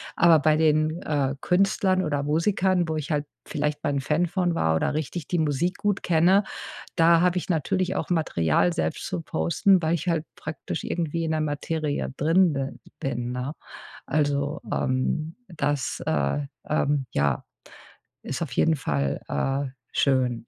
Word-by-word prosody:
Aber 170 -2 +6
bei 155 +1 +3
den, 155 +1 +2
äh, 140 -2 0
Künstlern 190 +1 +2
oder 145 -4 -1
Musikern, 175 +3 +1
wo 160 - -1
ich 155 +1 -4
halt 150 -1 0 0.2
vielleicht 150 0 -2
mal - - 0
'n 140 - 0
Fan 150 +5 +1
von 175 -1 0
war 80 - +2
oder 80 - 0
richtig 155 +1 -3
die 175 - 0
Musik 155 +4 0
gut 205 -2 0
kenne, 180 +4 +4 0.5
da 170 -1 +5
habe 180 0 +2
ich 180 - -3
natürlich 185 +3 0
auch - - -2
Material 90 - +2
selbst 80 -1 -2
zu 90 - -3
posten, 85 - +2
weil 160 +1 +2
ich 170 +2 -5
halt 165 -2 0
praktisch 160 0 -5
irgendwie 165 -1 -2
in 160 - -1
der 155 0 0
Materie 150 0 -2
drin 165 +3 +4
bi 135 -1 -2 0.3
bin, 125 -2 -3
ne? 125 +3 -3 0.5
Also, 145 0 0
ähm, 155 +5 -1
das, 145 -6 -2
äh, 70 - +1 0.3
ähm, 145 -2 +1
ja, 70 -3 0 0.8
ist 135 - -4
auf 150 - -6
jeden 160 +6 +3
Fall, 70 - -1
äh, 135 0 -1 0.2
schön. 125 -4 +1
155 Hz, 160 wpm, -25 LUFS, 135-170 Hz, 0.8 s, Aber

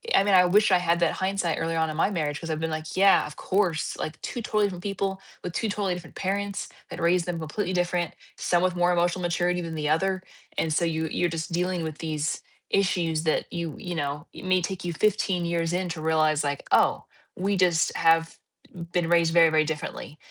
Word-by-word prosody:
I - - +5
mean, 200 -1 +2
I 180 -1 +7
wish 205 +3 +4
I 185 - +6
had 170 -1 +1
that 170 - +3
hindsight 190 -3 -1
earlier 165 0 -1
on 160 -1 +1
in 155 - -5
my 180 - +3
marriage 150 -6 -2
'cause 165 - -7
I've 155 0 -1
been 165 - -1
like, 155 0 -5
"Yeah, 195 -3 +5
of 150 - -10
course, 185 -5 0
like 155 - -5
2 240 - -4
totally 215 -1 +1
different 180 -2 -7
people 195 -1 -2 0.2
with 180 - -4
2 225 - -1
totally 200 -3 -1
different 175 -2 -9
parents 200 +1 -2 0.2
that - - -7
raised 170 +1 +3
them 175 -1 -3
completely 180 +4 -3
different, 175 -1 0 0.2
some 175 0 +1
with 180 -1 +1
more 175 0 +3
emotional 175 +1 +1
maturity 175 +1 0
than 165 -1 -5
the 150 -1 -1
other." 185 +4 +1 0.4
And 160 - 0
so 170 +3 +2
you 160 -1 -1
you're 175 - +1
just 165 +1 -4
dealing 180 0 -1
with 155 -1 -5
these 155 -1 -2 0.3
issues 170 -5 +1
that 155 - 0
you 170 -3 -4
you 180 -1 -5
know, 145 -1 -3
it - - -10
may 185 -1 +3
take 180 0 -4
you 170 - -2
15 195 -2 +1
years 170 0 -1
in 180 0 -1
to 165 -2 -5
realize, 155 -1 +2
like, 145 -1 -2
"Oh, - - +4 0.3
we 195 +1 0
just 175 -3 +3
have 165 0 +3 0.5
been 175 -2 0
raised 170 -1 +3
very, 165 -1 +7
very 155 -1 +3
differently 150 0 -5
175 Hz, 220 wpm, -26 LUFS, 160-185 Hz, 0.5 s, I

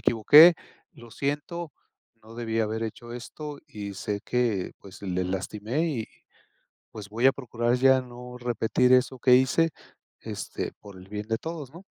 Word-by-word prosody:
equivoqué, 150 +10 +8 0.4
lo 120 -1 -14
siento, 145 +5 -3 0.5
no 110 +1 -14
debí 115 -1 -2
haber 110 +1 -1
hecho 120 +2 -6
esto 145 +4 -8
y 105 -8 -7
sé 100 +1 -3
que, 120 -7 0
pues, 100 0 -14
le 90 -2 -1
lastimé 105 - -2
y, 125 -9 -2 0.9
pues, 105 -2 -9
voy 115 +4 -1
a 135 - +8
procurar 120 -2 -2
ya 130 +1 +5
no 125 0 -10
repetir 125 +1 +2
eso 130 0 +2
que 125 +1 +6
hice, 130 +6 +3 0.5
este, - - -5
por 100 -2 -13
el 95 +1 -13
bien 105 0 -5
de 115 0 0
todos", 160 -4 -6
¿no? 175 - -12
120 Hz, 160 wpm, -26 LUFS, 110-135 Hz, 0.9 s, equivoqué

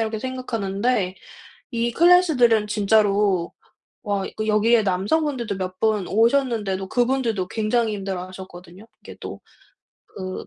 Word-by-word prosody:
이렇게 220 -1 -2
생각하는데 225 -5 -2 0.6
이 235 0 -1
클래스들은 300 - +4
진짜로 205 -3 +2 0.5
와 200 -2 -1
이거 215 +2 -5
여기에 220 +2 +3
남성분들도 225 +4 -1
몇 185 0 -5
분 215 -4 +1
오셨는데도 225 -5 +1
그분들도 240 -6 0
굉장히 220 +1 0
힘들어하셨거든요. 185 -1 -8 0.2
이게 - - -11
또 - - -7 0.7
그 185 -1 -7
215 Hz, 310 characters per minute, -22 LUFS, 195-235 Hz, 0.7 s, 클래스들은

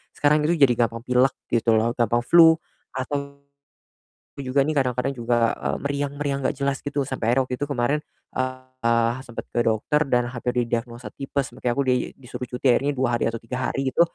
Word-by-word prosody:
sekarang 150 +1 +3
itu 170 - +3
jadi 140 -5 +5
gampang 115 0 -6
pilek 125 +1 +3 0.2
gitu 115 -1 +3
loh, 115 +2 +2
gampang 120 0 +2
flu 165 +2 +7 0.4
atau 140 +2 -4 1.0
juga 135 0 +1
nih 155 - 0
kadang-kadang 125 0 +1
juga, 120 -2 +1
eee, - - -2
meriang-meriang 140 0 -2
gak - - -2
jelas 140 -1 -1
gitu 145 -1 -2
sampai 120 -3 -1
akhirnya 135 - +3
waktu 125 - -2
itu 145 - 0
kemarin, 140 +2 +1 0.3
eee, 130 -3 0 0.2
sempet 120 - -7
ke 120 - +1
dokter 115 +7 +1
dan 120 -1 +2
hampir 125 0 -3
didiagnosa 120 +1 -4
tipes, 135 -1 -3
makanya 125 -1 -2
aku 140 - +2
di - - +4 0.2
disuruh 125 -1 -7
cuti 125 +2 -4
akhirnya 145 +3 +1
2 130 -1 0
hari - - 0
atau 115 0 -4
3 125 +2 -5
hari 135 -1 -1
itu - - -1
130 Hz, 185 wpm, -24 LUFS, 120-140 Hz, 1.0 s, flu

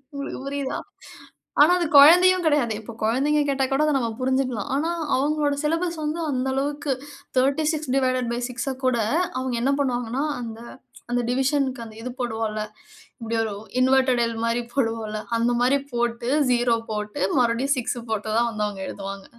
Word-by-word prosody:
உங்களுக்கு 280 0 -5
புரியுதா? 275 -1 -3 0.8
ஆனா 305 +4 +7
அது 345 - +1
கொழந்தையும் 360 +5 +7
கிடையாது. 290 -8 +2
இப்போ 230 +2 -9
குழந்தைங்க 275 +7 +2
கேட்டா 270 -1 +1
கூட, 270 +2 +2
அத 305 - +2
நம்ம 235 -3 -1
புரிஞ்சிக்கலாம். 255 -4 0
ஆனா 310 +4 0 0.3
அவுங்களோட 290 +1 +1
சிலபஸ் 335 +2 0
வந்து, 305 +3 -2
அந்த 260 0 -1
அளவுக்கு 285 +1 -2 0.5
36 300 +2 +1
டிவைடட் 255 -2 +1
பை 240 - -2
6அ 255 +2 -3
கூட 255 -2 +3 0.4
அவுங்க 255 -1 -2
என்ன 275 +2 +2
பண்ணுவாங்கன்னா, 245 0 -1 0.2
அந்த 225 -1 -7 0.5
அந்த 245 - +1
டிவிஷன்க்கு 265 -1 0
அந்த 220 -1 -12
இது 250 - -5
போடுவோம்ல. 220 -3 -2 0.6
இப்பிடி 230 -1 -3
ஒரு 220 -2 -3 0.3
இன்வெர்டட் 260 -1 +3
எல் 230 0 -3
மாரி 230 +1 0
போடுவோம் 225 -4 -1
இல்ல. 215 0 -4 0.2
அந்தமாரி 245 +3 +2 0.2
போட்டு, 235 0 -1 0.2
0 240 -1 +3 0.2
போட்டு 210 -1 -4 0.2
மறுபடியும் 250 +4 +2
6 250 0 -2
போட்டு 220 0 -2
தான் 235 0 +3
வந்து 215 -1 -2
வந்து - - +1
அவுங்க 195 -2 -8
எழுதுவாங்க. 195 0 -7
255 Hz, 160 wpm, -24 LUFS, 230-280 Hz, 0.8 s, ஆனா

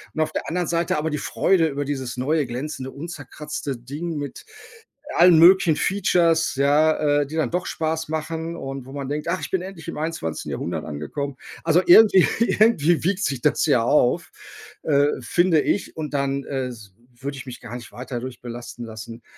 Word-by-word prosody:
und 155 - 0
auf 155 0 0
der - - -4
anderen 175 0 -1
Seite 170 -1 0
aber 155 +1 -1
die 150 - -1
Freude 170 +1 +2
über 145 -1 -3
dieses 130 -3 -4
neue 145 +4 +1
glänzende, 130 +1 -5
unzerkratzte 150 -2 -6
Ding 145 +8 -5
mit 145 - -6 0.7
allen 175 -1 +7
möglichen 175 -1 +6
Features, 170 -4 +2
ja, 145 +1 +3
äh, 145 - -2
die 155 - -7
dann 160 - 0
doch 180 +1 -1
Spaß 160 0 -2
machen 160 +1 -3
und 135 -4 -6
wo 135 - -10
man 140 -2 -5
denkt: 150 +2 -3
„Ach, 180 +2 -1
ich - - -6
bin 190 - 0
endlich 185 -3 -9
im - - -6
21. 155 - -4
Jahrhundert - - -3
angekommen.“ 80 - -5 0.3
Also 165 +2 +4
irgendwie 190 0 +8
irgendwie 210 -8 +3
wiegt 195 +3 0
sich 135 -3 -2
das - - +2
ja - - +3
auf, - - +2 0.5
äh, 145 -2 +3
finde 165 +6 +3
ich, 200 - -1
und 150 -2 -5
dann 140 0 -1
äh 135 -2 -2
s 110 -6 -11 0.3
würde 140 +1 -5
ich 130 - -8
mich 125 -2 -9
gar - - -8
nicht 120 -2 -9
weiter 125 +3 -7
dadurch 125 +1 -6
belasten 120 0 -8
lassen. 115 +1 -9
150 Hz, 190 wpm, -23 LUFS, 135-165 Hz, 0.7 s, irgendwie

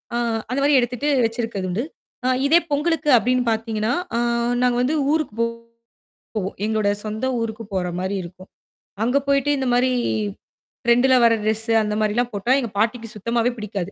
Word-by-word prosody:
அ - - +1 0.3
அந்தமாரி 280 +2 +3
எடுத்துட்டு, 250 +5 -2 0.2
வச்சிருக்கது 225 -4 -3
உண்டு. 220 +7 -1 0.4
அ - - +2 0.2
இதே 325 +4 +6
பொங்கலுக்கு 300 +1 0
அப்பிடின்னு 250 +1 +1
பாத்தீங்கன்னா, 220 0 -1 0.2
அ - - +2 0.4
நாங்க 250 -1 +3
வந்து 295 +5 +1 0.2
ஊருக்குப் 270 -9 -2 1.0
போவோம். 195 -2 -3
எங்களோட 215 -2 +1 0.2
சொந்த 215 +4 -3 0.2
ஊருக்குப் 220 -2 -5
போறமாரி 185 +1 -2
இருக்கும். 185 +2 -12 0.6
அங்க 250 +4 +2
போயிட்டு 280 +1 +2
இந்த 265 -1 -1
மாரி 255 +1 +3 0.9
ட்ரெண்டுல 245 +2 +4
வர 230 - +5
ட்ரெஸ்ஸு 220 +1 0
அந்த 210 0 -2
மாரில்லாம் 235 +3 0
போட்டா 205 +5 -1
எங்க 235 - -3
பாட்டிக்கு 230 +2 0
சுத்தமாவே 230 +3 0
பிடிக்காது. 200 -3 -4
230 Hz, 145 wpm, -22 LUFS, 210-255 Hz, 1.0 s, இதே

